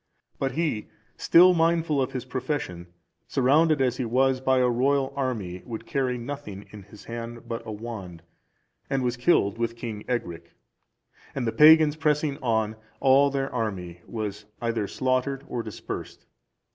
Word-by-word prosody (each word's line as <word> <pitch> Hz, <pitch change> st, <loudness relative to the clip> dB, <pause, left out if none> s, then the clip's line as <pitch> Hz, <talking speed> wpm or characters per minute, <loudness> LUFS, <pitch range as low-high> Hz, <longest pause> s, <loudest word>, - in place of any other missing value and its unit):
But 135 Hz, -1 st, -1 dB
he, 150 Hz, -9 st, -1 dB, 0.3 s
still 180 Hz, +2 st, +6 dB
mindful 165 Hz, -3 st, +2 dB
of 130 Hz, -, -1 dB
his 130 Hz, -1 st, -4 dB
profession, 130 Hz, -, -4 dB, 0.4 s
surrounded, 145 Hz, +2 st, +3 dB
as 125 Hz, -1 st, 0 dB
he 130 Hz, -, -1 dB
was, 130 Hz, +2 st, +2 dB
by 130 Hz, 0 st, +2 dB
a 125 Hz, -1 st, +4 dB
royal 135 Hz, +3 st, +1 dB
army, 110 Hz, -10 st, -3 dB
would 115 Hz, -2 st, -7 dB
carry 130 Hz, -3 st, -1 dB
nothing 120 Hz, -6 st, -7 dB
in 105 Hz, -, -10 dB
his 100 Hz, +2 st, -15 dB
hand 115 Hz, 0 st, -7 dB
but 115 Hz, 0 st, -4 dB
a -, -, -4 dB
wand, 105 Hz, -6 st, -7 dB, 0.7 s
and 135 Hz, -2 st, 0 dB
was 120 Hz, -1 st, 0 dB
killed 120 Hz, -, +2 dB
with 115 Hz, 0 st, -1 dB
King 115 Hz, -3 st, -6 dB
Ecgric; 85 Hz, -9 st, -4 dB, 0.8 s
and 135 Hz, -3 st, -2 dB
the 115 Hz, -, 0 dB
pagans 155 Hz, +1 st, +7 dB
pressing 150 Hz, -2 st, 0 dB
on, 110 Hz, -3 st, 0 dB, 0.2 s
all 135 Hz, +1 st, +5 dB
their 135 Hz, 0 st, -2 dB
army 95 Hz, -7 st, -4 dB
was 105 Hz, -2 st, -5 dB
either 115 Hz, -3 st, -1 dB
slaughtered 130 Hz, +3 st, -1 dB
or 120 Hz, -, -3 dB
dispersed. -, -, -7 dB
125 Hz, 155 wpm, -26 LUFS, 110-140 Hz, 0.8 s, pagans